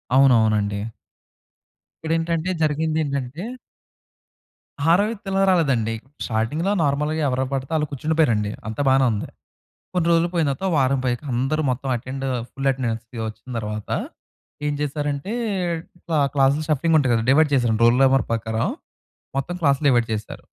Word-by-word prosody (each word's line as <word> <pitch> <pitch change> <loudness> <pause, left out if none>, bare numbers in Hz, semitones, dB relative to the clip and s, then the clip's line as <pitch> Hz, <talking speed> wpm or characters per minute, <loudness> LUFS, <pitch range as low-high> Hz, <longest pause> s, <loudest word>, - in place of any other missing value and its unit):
అవును, 135 -1 +6
అవును 110 -1 +3
అండి. 100 0 -3 1.2
ఇక్కడ 160 - +1
ఏంటంటే 165 +2 -1
జరిగింది 155 +1 +1
ఏంటంటే 140 +3 -4 1.5
ఆరో 185 +4 +5
వ్యక్తి 210 -3 -8
ఇలా 195 - +2
రాలేదండి. 130 -11 +2 0.3
స్టార్టింగ్‌లో, 120 - -1
నార్మల్‌గా 150 +2 0
ఎవరు 130 0 0
పడితే 135 +2 -3
వాళ్ళు 150 -1 +1
కూర్చుండిపోయారండి. 140 -8 +1 0.2
అంతా 110 +6 -3
బానే 135 0 +4
ఉంది. 105 -1 -3 0.7
కొన్ని 175 -2 +1
రోజులు 170 +1 +3
పోయిన 160 -4 +2
తర్వాత 135 +8 -4
ఓ - - -1
వారం 135 0 +2
పోయాక 120 +1 -1
అందరూ 135 +6 0
మొత్తం 130 +2 -3
అటెండ్ 130 +3 -6 0.3
ఫుల్ 135 0 -5
అటెండెన్స్‌కి 120 -2 -4
వచ్చిన 110 +3 -9
తర్వాత, 105 -1 -5 0.8
ఏం 150 - +1
చేశారంటే, 145 +5 -2 0.7
ఇట్ల 170 - -9 0.2
క్లాసులు 140 +3 +3
షఫ్లింగ్ 155 +2 +2
ఉంటాయి 130 -4 +2
కదా! 115 0 0
డివైడ్ 150 +2 +4
చేసారు 120 -4 +2
రోల్ 120 +2 +5
నంబర్ 135 -3 +4
ప్రకారం. 110 0 -1 0.7
మొత్తం 170 +6 -3
క్లాస్‌లు 140 0 +2
డివైడ్ 120 -3 +3
చేశారు. 105 0 -7
135 Hz, 145 wpm, -22 LUFS, 120-155 Hz, 1.5 s, అవును